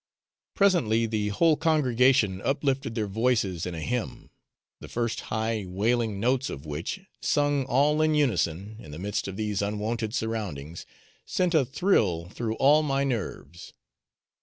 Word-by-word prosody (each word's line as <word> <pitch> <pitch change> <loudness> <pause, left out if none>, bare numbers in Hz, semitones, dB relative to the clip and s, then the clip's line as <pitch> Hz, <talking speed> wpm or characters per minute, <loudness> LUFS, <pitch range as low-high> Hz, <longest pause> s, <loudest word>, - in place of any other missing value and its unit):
Presently 120 - +3
the 110 -2 -1
whole 155 +10 +3
congregation 130 - +2
uplifted 135 -3 -1
their 110 -3 0
voices 105 -5 0
in 90 - -5
a 80 - -5
hymn, 125 +5 -4 0.5
the - - -10
first 115 -1 -2
high 110 0 -1
wailing 110 +2 0
notes 125 +4 +1
of 70 - -7
which 75 - -4 0.2
sung 145 -2 +1
all 145 +4 +2
in 155 0 +3
unison, 105 - 0
in 80 - -11
the 75 - -8
midst 100 +3 -3
of 95 0 -6
these 105 -2 -1
unwonted 105 +2 -2
surroundings 90 -9 -4 0.4
sent 180 -1 0
a 155 -4 +5
thrill 105 - +1
through 110 +2 -3
all 145 +5 +5
my 140 -2 0
nerves. 95 - -4
115 Hz, 145 wpm, -27 LUFS, 100-135 Hz, 0.5 s, a